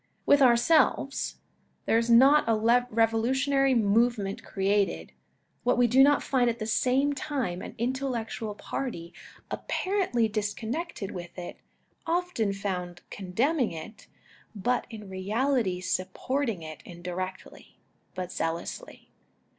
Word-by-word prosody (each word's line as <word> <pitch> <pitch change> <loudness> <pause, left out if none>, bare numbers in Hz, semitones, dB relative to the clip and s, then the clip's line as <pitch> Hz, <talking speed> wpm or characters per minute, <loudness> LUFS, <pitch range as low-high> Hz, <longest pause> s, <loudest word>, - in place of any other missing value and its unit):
With 285 0 +5
ourselves, 265 +2 +3 0.5
there 225 - +3
is 230 +1 -2
not 270 +6 +6
a - - +5
revolu 225 0 +2
tionary 270 -2 +3
movement 215 -1 +1
created, 200 0 0 0.5
that 245 0 +2
we 245 - +5
do 250 +3 +5
not 285 +1 +5
find 250 -3 +2
at 230 - -2
the 215 - -4
same 260 +6 +2
time 260 -11 -3
an - - -8
intellectual 235 -3 -3
party 180 -9 -5 0.4
apparently 370 - 0
disconnected 220 - -3
with 175 -1 -8
it, 175 -1 -7 0.5
often 335 - 0
found 180 -3 -4
condemning 235 - 0
it, 165 +7 -10 0.5
but 245 +5 0
in 215 -3 -9
reality 205 +1 0
supporting 190 - -2
it 155 -1 -9
indirectly, 180 +1 -7 0.4
but 185 -1 -4
zealously. 170 - -5
230 Hz, 115 wpm, -28 LUFS, 190-265 Hz, 0.5 s, not